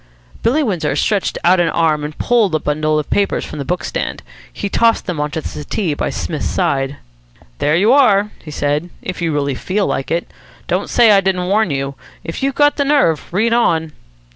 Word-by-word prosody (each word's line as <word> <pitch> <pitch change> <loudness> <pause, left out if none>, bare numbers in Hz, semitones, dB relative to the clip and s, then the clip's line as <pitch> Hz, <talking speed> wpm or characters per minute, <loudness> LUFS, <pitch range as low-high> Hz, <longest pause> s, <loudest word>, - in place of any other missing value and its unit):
Billy 290 +7 +2
Windsor 195 - -1
stretched 205 -3 0
out 180 +1 +4
an 170 -1 +2
arm 155 -3 +1
and 150 0 -6
pulled 220 -8 +2
a - - +1
bundle 155 +1 0
of 150 - -2
papers 200 -1 +1
from - - -8
the 140 - -4
book 180 +4 -2
stand. - - -4 0.3
He 200 - -4
tossed 230 +3 +2
them 175 -5 -3
on 150 0 -1
to 160 +2 -4
the - - -5
settee 155 +3 -3
by - - -2
Psmith's 155 -4 -3
side. 135 0 -1 0.6
"There 150 +2 +2
you 205 +8 +4
are," 210 -7 +4
he 155 - -9
said, 150 +3 -1
"if 180 -1 -5
you 165 -1 0
really 140 -2 0
feel 190 +9 -1
like 135 - -2
it. 170 +1 -1 0.4
Don't - - -1
say 235 -3 +5
I 200 -1 +5
didn't 185 -2 0
warn 200 +1 +2
you. 135 -1 -2 0.3
If 165 - -6
you've 275 0 0
got 290 0 +3
the 285 - +2
nerve, 275 - +2
read 220 +6 +1
on." 160 -9 +1
175 Hz, 210 wpm, -17 LUFS, 150-210 Hz, 0.6 s, say